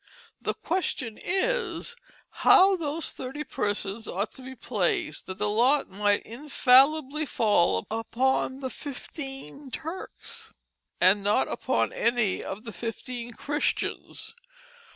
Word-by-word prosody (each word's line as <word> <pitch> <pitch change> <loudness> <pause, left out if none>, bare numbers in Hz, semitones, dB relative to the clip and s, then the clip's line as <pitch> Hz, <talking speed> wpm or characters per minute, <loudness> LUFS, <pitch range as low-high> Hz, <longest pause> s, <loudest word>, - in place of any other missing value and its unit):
The - - -1
question 275 - -2
is, 460 +6 0 0.5
how 385 +1 +7
those 320 -2 -1
thirty 265 +4 -5
persons 205 -3 -2
ought 200 +4 -2
to 265 - -11
be 260 +1 -8
placed, 195 - -1
that 185 - -5
the 210 - +1
lot 245 +8 +3
might 205 +1 +1
infallibly 280 +3 +3
fall 175 - +2
upon 260 +4 0
the 260 -1 -3
fifteen 270 - -7
Turks 380 - -6 0.3
& - - -52
not 200 -6 +4
upon 115 -1 0
any 235 -4 +1
of 200 +3 -6
the 230 - -6
fifteen 235 +3 -5
Christians? 295 +6 -2
250 Hz, 115 wpm, -27 LUFS, 210-295 Hz, 0.5 s, how